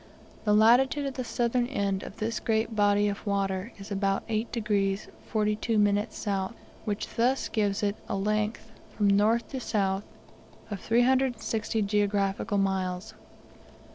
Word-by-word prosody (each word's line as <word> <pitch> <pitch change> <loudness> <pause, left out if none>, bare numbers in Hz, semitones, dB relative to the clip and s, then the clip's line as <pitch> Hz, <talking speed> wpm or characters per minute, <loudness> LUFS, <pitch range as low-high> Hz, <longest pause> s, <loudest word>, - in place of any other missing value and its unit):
The 210 - +4
latitude 255 +6 +5
of 275 - -2
the 255 - -3
southern 240 +1 0
end 200 -7 -1
of - - -9
this 230 +1 -2
great 220 0 0
body 205 0 +3
of 200 0 -3
water 195 +1 -1
is 200 +1 -10
about 195 0 0
8 220 +1 -1
degrees 205 -3 0 0.2
42 215 +1 0
minutes 205 0 +2
south, 195 0 -2 0.3
which 205 -2 -2
thus 250 +3 +2
gives 205 -2 0
it 205 0 +1
a - - -1
length, 215 +3 -1 0.3
from 205 - +3
north 220 +3 +3
to 265 - -4
south, 195 -4 0 0.7
of 200 - -3
360 230 -2 +1
geographical 200 -1 0
miles. 190 0 -1
210 Hz, 140 wpm, -28 LUFS, 200-230 Hz, 0.7 s, latitude